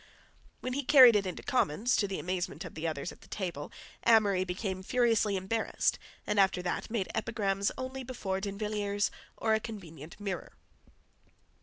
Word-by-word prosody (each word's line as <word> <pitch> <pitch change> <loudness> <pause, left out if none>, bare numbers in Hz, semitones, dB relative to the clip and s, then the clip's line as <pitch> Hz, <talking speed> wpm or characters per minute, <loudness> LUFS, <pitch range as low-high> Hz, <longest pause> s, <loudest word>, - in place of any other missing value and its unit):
When 255 - -3
he 280 - 0
carried 255 -4 +9
it 200 -2 +2
into 180 - -5
Commons, 240 - +1
to 200 - +2
the 195 - -3
amazement 180 0 -3
of 175 - -8
the 160 +1 -3
others 155 0 -3
at - - -16
table, 175 -7 -4 0.3
Amory 205 -5 +4
became 185 +1 -3
furiously 225 -1 +2
embarrassed, 195 +4 0 0.3
and 210 -1 +1
after 190 -2 +3
that 180 - -2
made 220 -4 -1
epigrams 205 -3 0
only 260 +1 -5
before 200 -7 -3
D'Invilliers 205 0 -1 0.3
or 220 - +1
a 220 - +3
convenient 170 -8 -9
mirror. 195 -5 -4
200 Hz, 155 wpm, -31 LUFS, 185-225 Hz, 0.3 s, carried